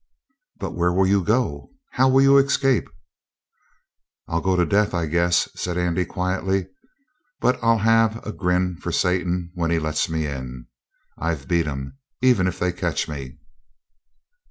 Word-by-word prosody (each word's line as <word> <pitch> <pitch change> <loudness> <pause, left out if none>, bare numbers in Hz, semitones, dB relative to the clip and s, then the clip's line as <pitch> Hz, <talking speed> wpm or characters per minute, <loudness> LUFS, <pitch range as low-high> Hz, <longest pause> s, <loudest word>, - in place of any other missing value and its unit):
"But - - -4
where 90 0 +1
will 95 +2 +2
you 100 0 +2
go? 110 - -1 0.2
How 130 +1 +3
will 135 +1 +5
you 135 0 +6
escape?" 135 -2 +2 1.4
"I'll 85 +1 -1
go 95 +2 +1
to 90 -1 +2
death, 105 +2 +1
I 85 -1 0
guess," 85 +2 +2
said 90 -1 -3
Andy 90 0 0
quietly. 95 +1 -1 0.7
"But 125 0 +1
I'll 115 0 +3
have 115 +1 +3
a 105 - -3
grin 90 -2 0
for 90 - -5
Satan 90 0 0
when 85 -2 -1
he 85 - +2
lets 80 0 -1
me 80 -1 -1
in. 65 -4 -6 0.5
I've 80 -4 -3
beat 85 -2 +1
'em, 70 - -6 0.2
even 125 -8 +3
if 90 - -3
they 90 - 0
catch 85 -5 -2
me." 70 -3 -7
90 Hz, 155 wpm, -23 LUFS, 85-105 Hz, 1.4 s, you